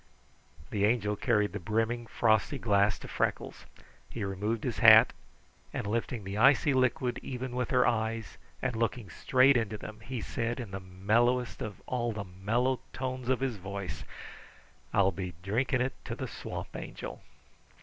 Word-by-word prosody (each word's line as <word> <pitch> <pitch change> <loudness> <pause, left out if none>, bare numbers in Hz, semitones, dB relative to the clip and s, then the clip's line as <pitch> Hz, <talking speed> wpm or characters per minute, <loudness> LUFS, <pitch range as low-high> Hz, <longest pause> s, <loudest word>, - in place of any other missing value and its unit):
The 100 -2 0
Angel 105 -1 +2
carried 105 -3 +1
the 105 - -3
brimming, 115 +5 -1
frosty 110 -2 +2
glass 100 -2 +2
to - - -10
Freckles. - - -2 0.4
He 115 - -5
removed 105 +3 -2
his - - -2
hat, - - +8 0.6
and - - -3
lifting 115 +1 -2
the 100 +2 -4
icy 135 +3 +5
liquid 130 -1 +1
even 125 -1 -5
with 125 0 -1
her 125 -1 +4
eyes 110 -2 -1 0.2
and 125 - 0
looking 115 -3 -2
straight 130 - +4
into 110 -3 0
them, 105 +1 -9
he 120 +3 -5
said 115 +2 -3
in 115 -6 -6
the 95 - -4
mellowest 110 +7 +1
of 105 - -6
all 120 -2 -1
the 105 -1 -4
mellow 110 +8 0
tones 130 -1 -4
of 130 0 +2
his 130 -5 -1
voice: 100 0 -6 0.9
"I'll 95 -1 +4
be 90 -2 -5
drinking 125 +6 +1
it 130 +1 0
to - - -4
the - - -4
Swamp - - -7
Angel." - - -7
115 Hz, 160 wpm, -30 LUFS, 100-125 Hz, 0.9 s, hat